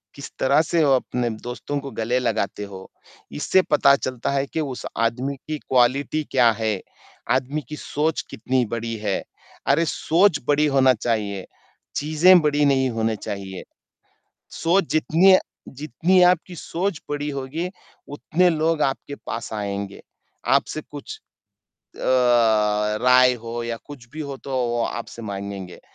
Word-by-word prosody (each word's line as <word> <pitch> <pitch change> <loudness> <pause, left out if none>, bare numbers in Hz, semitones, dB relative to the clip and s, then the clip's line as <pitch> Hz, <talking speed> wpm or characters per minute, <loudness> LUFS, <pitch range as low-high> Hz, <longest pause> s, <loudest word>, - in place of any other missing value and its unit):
किस 140 - -9
तरह 140 +3 +4
से 170 -2 +3
वो 140 - +4
अपने 125 -1 -1 0.2
दोस्तों 140 +4 -4
को 140 -1 -8
गले 120 +3 +1
लगाते 110 -4 -1
हो। 95 0 -10 0.4
इससे 75 - +2
पता 140 -1 +6
चलता 130 -1 -3
है 140 0 0
कि 160 - -4
उस 135 -4 -5 0.2
आदमी 130 +4 -2
की 155 0 -2
क्वालिटी 135 +5 +1
क्या 120 -3 +5
है? 110 -4 -1 0.6
आदमी 140 +4 -3
की 150 - -5
सोच 150 +2 -1
कितनी 125 +3 0
बड़ी 115 0 -3
है, 100 - 0 0.5
अरे! 155 +5 +3
सोच 170 +1 +2
बड़ी 145 +1 +3
होनी 135 -2 +4
चाहिए, 105 -5 -1 0.5
चीज़ें 155 +5 +5
बड़ी 150 -1 +2
नहीं 135 -2 +3
होनी 110 0 0
चाहिए। 95 -2 -6 0.9
सोच 180 +4 +1
जितनी 165 +4 +5 0.3
जितनी 155 +7 +1
आपकी 180 0 -2
सोच 175 +1 -3
बड़ी 145 0 -2
होगी, 140 +6 -4 0.4
उतने 160 +5 +1
लोग 160 -1 +1
आपके 135 +1 -2
पास 115 -1 -5
आएँगे, 100 -1 -4 0.5
आपसे 155 - +1
कुछ 145 -2 -8 0.8
अ, - - -11 1.0
राय 125 0 +6
हो 120 0 -4
या 115 0 -3
कुछ 135 -5 -11
भी 155 - -7
हो 140 -2 -5
तो - - -7 0.2
वो 120 0 -1
आपसे 115 0 -6
माँगेगे। 100 -3 -6
135 Hz, 145 wpm, -23 LUFS, 115-155 Hz, 1.0 s, पता